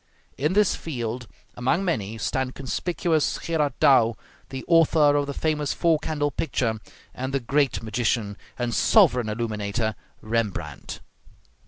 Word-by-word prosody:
In 150 +6 0
this 210 -1 +3
field, 120 -5 -5 0.3
among 165 +11 0
many, 110 - -2
stand 130 +3 -2
conspicuous 160 +3 -1
Gerard 155 -4 0
Dow, 115 -4 +5 0.3
the 130 -1 -6
author 160 -3 +5
of 145 -1 +1
the 140 - -3
famous 150 -2 0
four 165 -3 +2
candle 145 -2 -1
picture, 125 -9 -1 0.3
and 130 +2 -4
the - - +2
great 135 0 0
magician 110 -1 -1 0.2
and 120 -1 -2
sovereign 125 - +4
illuminator 110 0 -2 0.3
Rembrandt. 110 -3 -3
130 Hz, 130 wpm, -25 LUFS, 115-155 Hz, 0.3 s, Dow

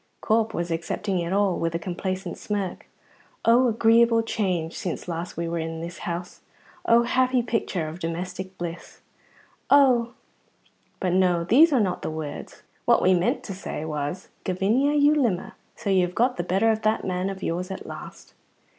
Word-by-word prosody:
Corp 220 0 +1
was 170 -4 -3
accepting 180 +3 -2
it 170 0 -3
all 195 -2 +2
with 165 0 -1
a - - +2
complacent 185 +2 -4
smirk. 200 -4 -4 0.6
Oh, 240 +3 +5
agreeable 230 0 +4
change 180 -7 -2
since 180 -1 -4
last 170 0 -5
we 170 0 -2
were 170 0 -2
in 165 0 -4
this 170 +2 -7
house! 175 +2 -5 0.5
oh, 235 +1 +6
happy 255 0 +2
picture 220 -8 -2
of 160 +3 -7
domestic 180 +3 -5
bliss! 170 -1 -7 0.7
oh 250 -4 +5 0.9
but 180 -2 0
no, 180 -2 +3
these 285 - +6
are 270 - +3
not 185 -5 0
the - - -3
words; 155 -2 -7 0.2
what - - +4
we 185 - +5
meant 180 0 +1
to 195 - -6
say 180 -4 -5
was, 150 +3 -4
"Gavinia, 220 +11 +1
you 290 +1 +5
limmer, 235 -12 0 0.2
so 205 -4 -3
you 190 -1 +4
have 180 0 -3
got 245 +2 +2
the 175 - -1
better 195 +6 +2
of 220 0 -1
that 215 0 +1
man 185 +1 -1
of 195 0 -7
yours 180 +3 -2
at 190 - -6
last." - - -10
185 Hz, 175 wpm, -25 LUFS, 175-225 Hz, 0.9 s, oh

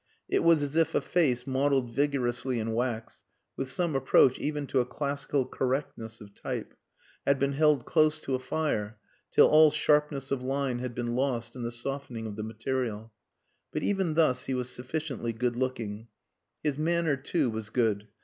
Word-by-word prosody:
It - - +1
was 165 -3 +5
as 145 +1 -3
if 160 -1 +2
a - - +5
face 130 -8 +1
modelled 135 -2 +1
vigorously 130 -2 0
in 110 0 -2
wax 115 -1 -3 0.3
(with 135 - -4
some 170 +2 -1
approach 130 -1 +4
even 150 -1 -2
to 135 - +1
a 125 - +2
classical 140 0 -2
correctness 125 -5 -3
of 100 -2 -13
type) - - -5 0.5
had 140 - +3
been 140 +1 0
held 150 -3 +3
close 155 -1 +3
to 135 - -3
a 130 - +1
fire 130 -6 -2 0.3
till - - +6
all 155 0 +7
sharpness 150 -2 +1
of 135 -2 0
line 135 -1 -1
had 125 -1 -5
been 120 -1 -2
lost 125 -3 -1
in 125 - -6
the 120 - -2
softening 120 -1 -5
of 105 -2 -5
the 110 - -5
material. 110 0 -3 0.6
But - - -3
even 190 -6 0
thus 135 -6 +3
he 135 - -1
was 125 0 -2
sufficiently 125 -2 -3
good 120 +1 -1
looking. 120 -4 -3 0.6
His 150 -1 0
manner, 165 -1 +2
too, 135 0 0
was 110 -1 -5
good. 110 -3 0
130 Hz, 180 wpm, -29 LUFS, 120-145 Hz, 0.6 s, all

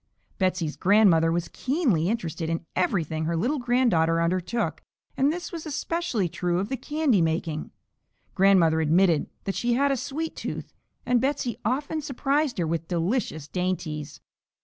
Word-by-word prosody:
Betsey's 185 -5 0
grandmother 185 -5 +4
was 170 0 -1
keenly 250 - +1
interested 170 -7 -2
in 165 0 -2
everything 160 -4 0
her 165 +1 0
little 265 - 0
granddaughter 235 -10 +2
undertook, 180 +6 -1 0.3
and 275 +2 +3
this 350 +2 -5
was 335 -3 -6
especially 300 - -1
true 175 +1 -1
of 195 +4 -2
the 265 - -1
candy 295 - +1
making. 160 -1 -1 0.6
Grandmother 185 -5 +4
admitted 165 0 +3
that 195 - -2
she 240 +3 0
had 280 +3 +2
a - - +2
"sweet 285 +5 -4
tooth," - - -6 0.3
and 245 -1 +2
Betsey 260 -3 -1
often 285 +7 -1
surprised 285 0 0
her 175 - 0
with 165 0 -2
delicious 170 - -1
dainties. 165 -5 -3
190 Hz, 150 wpm, -26 LUFS, 165-260 Hz, 0.6 s, grandmother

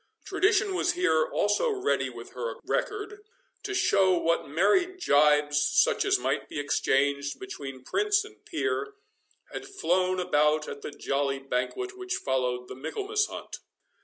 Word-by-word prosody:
Tradition 400 0 +2
was 355 -1 +1
here 160 - +2
also 205 - +1
ready 415 -1 0
with - - -10
her 480 - -4
record, 415 0 -2 0.4
to 405 -1 -4
show 190 - +3
what 165 -3 0
merry 200 - +3
gibes, 150 - +3
such 465 - +3
as 390 0 +3
might - - -2
be - - -4
exchanged 140 0 0
between 135 -9 -8
prince 415 - +1
and 425 0 -15
peer, 420 -1 -2 0.6
had - - -6
flown 185 - 0
about 150 -3 +2
at 140 - -7
the - - -5
jolly 140 -1 -1
banquet 135 - -3
which 370 0 -2
followed 125 -2 -1
the - - -7
Michaelmas 395 - -1
hunt. - - -8
185 Hz, 145 wpm, -28 LUFS, -, 0.6 s, show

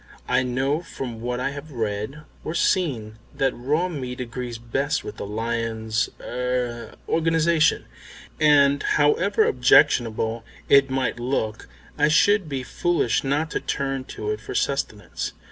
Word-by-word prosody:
I - - +3
know 130 +5 0
from 125 -9 -7
what 125 +1 -2
I 130 +2 -1
have 145 +2 -9
read 110 +4 -3 0.2
or 160 - -4
seen 115 - 0 0.2
that 135 -1 +1
raw 150 +9 0
meat 130 -7 -5
agrees 120 -1 -5
best 135 +5 -1
with 105 - -8
the - - -5
lion's 110 0 -1
er 125 -1 -3
organisation, 165 0 +2 0.5
and 145 -2 +5
however 180 +9 +3
objectionable 115 -2 +3 0.2
it 140 -1 +6
might 130 -2 -1
look 115 -4 -2 0.3
I 150 - +5
should 195 +3 +3
be 135 -2 -3
foolish 170 -1 0
not 145 +4 0
to - - -1
turn 135 -2 -2
to 105 -4 -4
it 105 0 -4
for - - -7
sustenance. 110 -9 -2
130 Hz, 140 wpm, -24 LUFS, 115-150 Hz, 0.5 s, it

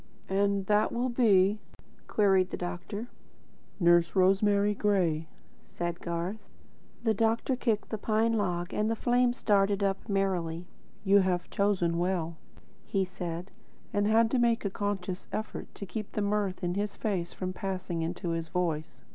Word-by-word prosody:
"And 200 0 +1
that 210 +2 +2
will 245 +2 0
be 210 -4 +4 0.2
?" - - -30
queried 190 -3 +3
the - - -4
doctor. 180 +5 -5 0.7
"Nurse 175 -1 +4
Rosemary 200 +2 +4
Gray," 180 -7 +1 0.4
said 175 0 -4
Garth. 175 +5 -4 0.5
The 225 -2 +3
doctor 225 +4 +1
kicked 225 -4 -1
the 220 - -2
pine 220 +2 +1
log, 180 -4 -1
and 215 +1 +1
the 225 - +1
flames 245 +1 +1
darted 200 -1 +3
up 195 +3 -1
merrily. 180 -4 0 0.4
"You 200 0 +5
have 180 -2 0
chosen 180 -4 +1
well," 175 -2 -1 0.5
he 195 -1 0
said, 180 0 -6 0.4
and 205 0 +2
had 225 +1 +4
to 260 - +2
make 235 -2 +2
a 200 - 0
conscious 195 -2 -3
effort 220 - -4
to 200 - -6
keep 215 +1 -6
the 210 - -1
mirth 200 -2 -1
in 175 0 0
his 205 +2 -2
face 185 -5 -2
from 185 -1 -4
passing 185 -3 -3
into 170 +1 -3
his 165 -1 -2
voice. 160 -3 -2
195 Hz, 155 wpm, -29 LUFS, 175-210 Hz, 0.7 s, You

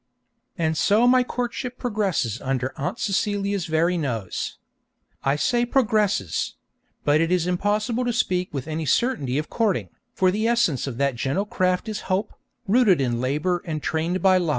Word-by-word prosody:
And 160 -2 0
so 210 +8 +3
my 255 0 +5
courtship 250 0 -4
progresses 195 - -1
under 130 -1 -2
Aunt 140 - -3
Celia's 200 -1 -1
very 165 +3 +1
nose. 115 - -3 0.7
I 135 +1 +2
say 240 +10 +1
'progresses'; 215 - +1 0.5
but 150 +2 +4
it 165 +1 +1
is 180 -2 +2
impossible 210 +6 0
to 245 - +1
speak 185 -5 0
with 135 -1 -5
any 160 0 -3
certainty 140 - +1
of 155 +1 -3
courting, 195 - 0 0.3
for 185 -1 +3
the 215 +4 0
essence 235 - +1
of 125 -4 -5
that 140 0 +1
gentle 140 - -1
craft 185 -1 0
is 215 -2 -5
hope, 190 +3 0 0.3
rooted 210 - +4
in 120 -3 0
labour 150 +7 0
and 155 -3 -4
trained 170 +4 -1
by 185 -1 +5
love. 175 -3 -1
180 Hz, 165 wpm, -24 LUFS, 150-215 Hz, 0.7 s, my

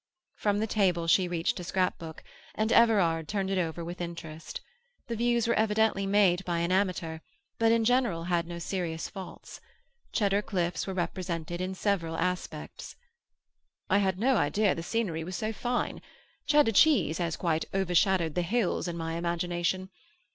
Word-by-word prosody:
From 205 -1 0
the 215 - +1
table 190 -6 +1
she 180 +2 +4
reached 175 0 -1
a - - -5
scrapbook, 175 -3 -2 0.3
and 215 +1 0
Everard 180 -10 +4
turned 195 0 -1
it 190 - +1
over 165 -1 -2
with 175 +2 -6
interest. 165 -2 -6 0.5
The 235 - -4
views 235 0 +1
were 235 - +3
evidently 215 -2 +2
made 195 -2 +3
by 175 -2 -1
an 170 +1 0
amateur, 180 -4 0 0.4
but 225 0 +4
in 230 -1 +3
general 240 -9 +2
had 170 -1 0
no 170 0 -6
serious 170 -2 -3
faults. 190 -3 -10 0.5
Cheddar 200 -2 +2
cliffs 180 -4 -2
were 190 - -3
represented 175 -1 -3
in 185 +1 -3
several 180 -5 -1
aspects. 175 -3 -4 1.0
"I 200 - +5
had 190 -2 +1
no 250 +4 +3
idea 200 +5 +2
the 165 - -5
scenery 170 -4 -2
was 180 +3 -5
so 220 +1 -2
fine. 245 +3 -2 0.5
Cheddar 295 -6 +5
cheese 225 - +4
has 170 -2 -1
quite 160 -3 0
overshadowed 185 -3 +2
the 180 - 0
hills 190 0 0
in 170 -1 -4
my 165 0 -3
imagination. 175 +2 -1
185 Hz, 160 wpm, -29 LUFS, 170-210 Hz, 1.0 s, I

